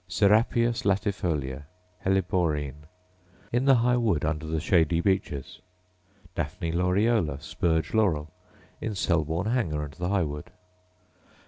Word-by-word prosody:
Serapias 110 +5 +3
latifolia, 90 - -1 0.4
helleborine, 80 -7 0 0.3
— 90 +1 -30
in 125 +2 +2
the 135 -1 +6
High 120 +1 +3
wood 105 -12 +1
under 75 0 -2
the 80 0 -1
shady 85 0 +2
beeches. 90 -6 -1 0.7
Daphne 85 +1 -3
laureola, 90 - +1
spurge 80 -1 -1
laurel, 85 -9 +1 0.3
— - - -29
in 110 -2 -3
Selborne 85 +3 0
Hanger 80 -12 0
and 75 -1 -7
the 90 +4 -3
High 100 -3 +2
wood. 75 -1 -5
90 Hz, 125 wpm, -27 LUFS, 75-100 Hz, 0.7 s, the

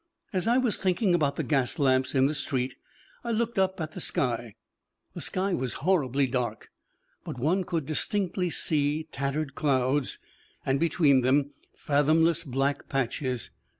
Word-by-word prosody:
As 185 +2 0
I 240 +2 +4
was 250 -5 +2
thinking 185 +1 +2
about 145 -5 +2
the - - -2
gas 135 -5 0
lamps 130 -2 +2
in 130 0 +5
the 145 - +1
street 135 -3 -2 0.5
I 235 - -4
looked 230 -1 0
up 190 0 +1
at 160 -1 -3
the 180 - -7
sky. 120 -7 -1 0.6
The - - -6
sky 190 +1 -1
was 130 -7 -1
horribly 140 -7 +2
dark, 125 -2 -3 0.5
but - - -6
one 165 +10 +1
could 165 -5 -2
distinctly 180 +3 -1
see 150 -1 +1
tattered 140 +1 -2
clouds, 135 -2 +1 0.5
and 135 +1 +1
between 150 -5 +3
them 140 +3 +2 0.3
fathomless 160 +3 +2
black 135 0 -1
patches. 130 -1 -2
145 Hz, 150 wpm, -27 LUFS, 135-175 Hz, 0.6 s, in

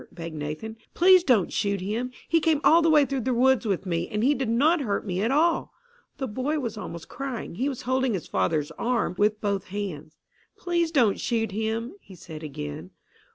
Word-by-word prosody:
begged 165 -2 -7
Nathan. 155 +10 -5 0.2
"Please 365 0 +6
don't 235 - +2
shoot 200 -1 0
him. 215 +7 -2 0.2
He 330 - +3
came 320 -2 +2
all 330 +2 +6
the 330 - +3
way 300 -2 +5
through 275 -1 -2
the 255 +1 0
woods 255 -1 +3
with 195 -1 -1
me, 170 -1 -1
and 210 +1 -2
he 280 +4 +4
did 265 -5 -2
not 295 +8 +3
hurt 210 -6 -2
me 185 -1 -2
at 225 - +1
all." 320 +5 +1 0.4
The 265 - -2
boy 260 +7 -2
was 235 -6 -3
almost 170 -6 -7
crying. 265 -8 -5
He 260 +11 -1
was 265 - -6
holding 260 -2 +1
his 175 - -5
father's 145 - 0
arm 235 -4 0
with 210 +1 +2
both 200 -3 -1
hands. 180 -6 -6 0.4
"Please 345 -2 0
don't 245 -11 +2
shoot 225 -4 -1
him!" 220 - -2
he 190 - -14
said 160 -3 -10
again. 85 - -6
225 Hz, 200 wpm, -26 LUFS, 190-270 Hz, 0.4 s, Please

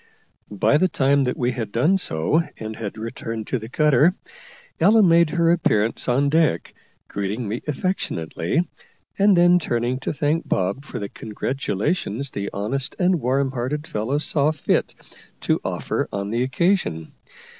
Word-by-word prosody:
By 145 - +4
the 185 - +3
time 140 -4 +2
that 125 - -2
we 125 0 0
had 115 -4 -4
done 160 - +2
so 80 - +1 0.2
and 110 0 -6
had 110 -1 -6
returned 115 0 -5
to 125 - 0
the 110 +1 -9
cutter, 150 +4 +3 0.6
Ella 220 +1 +5
made 170 -2 +5
her 170 0 +2
appearance 115 -10 +1
on 135 +3 +2
deck, 155 - +1 0.3
greeting 100 +4 -3
me 110 +4 -3
affectionately, 150 - -2 0.5
and 200 -1 +5
then 175 +1 +6
turning 120 -4 -1
to - - -3
thank 150 +3 -1
Bob 100 +10 -1
for - - -7
the 100 - -4
congratulations 125 - -3
the 100 0 -4
honest 130 +7 -2
and 180 -3 +2
warm 135 +2 +1
hearted 135 +4 -3
fellow 115 +2 -2
saw 150 -1 +2
fit 155 - -1 0.5
to - - 0
offer - - -2
on 100 +1 -3
the 115 +2 0
occasion. 130 - 0
130 Hz, 155 wpm, -22 LUFS, 110-160 Hz, 0.6 s, then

